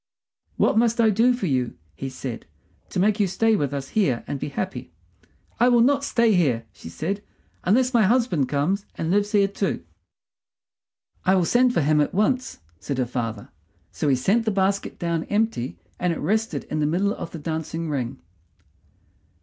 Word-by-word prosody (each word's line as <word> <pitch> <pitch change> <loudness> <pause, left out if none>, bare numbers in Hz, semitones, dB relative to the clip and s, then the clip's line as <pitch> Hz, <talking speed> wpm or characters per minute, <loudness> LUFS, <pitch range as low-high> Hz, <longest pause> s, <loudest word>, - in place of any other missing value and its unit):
"What 220 - +3
must 235 0 +2
I 225 -2 +5
do 230 +5 +4
for 245 -5 -1
you," 130 - -1 0.2
he 135 - -5
said, 130 - -7 0.4
"to - - -2
make 210 +3 +2
you 205 - +3
stay 225 +4 +2
with 145 -8 -1
us 140 -1 -4
here 140 - +1
and 140 - -4
be - - -3
happy?" 185 +7 -5 0.7
"I 245 - +5
will 240 -1 +5
not 280 +3 +3
stay 230 -5 +3
here," 130 - +2
she - - -11
said, 180 - -3 0.4
"unless 250 +7 +3
my 235 - +5
husband 210 - +2
comes 175 +8 0
and 165 +1 -2
lives 205 +1 +2
here 200 -1 +4
too." 195 - -2 1.4
"I 190 - +4
will 180 -2 +2
send 245 +4 +3
for - - +3
him 150 +1 +3
at 150 - -1
once," 255 - 0 0.2
said 140 - -4
her 130 - +1
father. 115 -4 -4 0.4
So - - -2
he 135 - +4
sent 200 - +1
the - - +2
basket 195 -1 0
down 170 -2 -1
empty, 205 - -1 0.2
and 180 -1 +1
it 165 - -2
rested 220 +8 -1
in 155 - -4
the 150 - +2
middle 195 +6 +1
of 165 - -6
the 170 - -8
dancing 160 +1 -4
ring. 130 - -3
185 Hz, 185 wpm, -24 LUFS, 145-220 Hz, 1.4 s, I